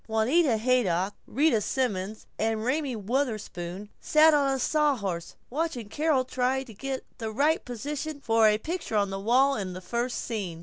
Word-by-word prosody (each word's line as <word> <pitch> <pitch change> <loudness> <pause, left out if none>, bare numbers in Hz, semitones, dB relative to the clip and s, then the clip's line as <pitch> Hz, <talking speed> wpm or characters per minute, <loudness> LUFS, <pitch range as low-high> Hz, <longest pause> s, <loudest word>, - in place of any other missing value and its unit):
Juanita 230 +4 +3
Haydock, 205 -6 +1
Rita 275 -3 +2
Simons, 210 -4 -2
and 220 0 0
Raymie 270 0 0
Wutherspoon 210 -5 -3
sat 310 +1 +5
on 280 -2 +3
a 270 - 0
sawhorse, 245 - 0 0.2
watching 265 -7 -2
Carol 295 -1 +1
try 260 +1 0
to 240 -4 -12
get 265 +5 -5
the 225 -2 -3
right 290 +8 +2
position 285 +5 -5
for 225 -4 +4
a 210 0 +4
picture 320 0 -4
on 200 -2 +2
the 195 - -3
wall 255 +7 +3
in 190 -4 -4
the 180 - -6
first 235 +7 -2
scene. 195 -8 -4
240 Hz, 165 wpm, -27 LUFS, 210-280 Hz, 0.2 s, sat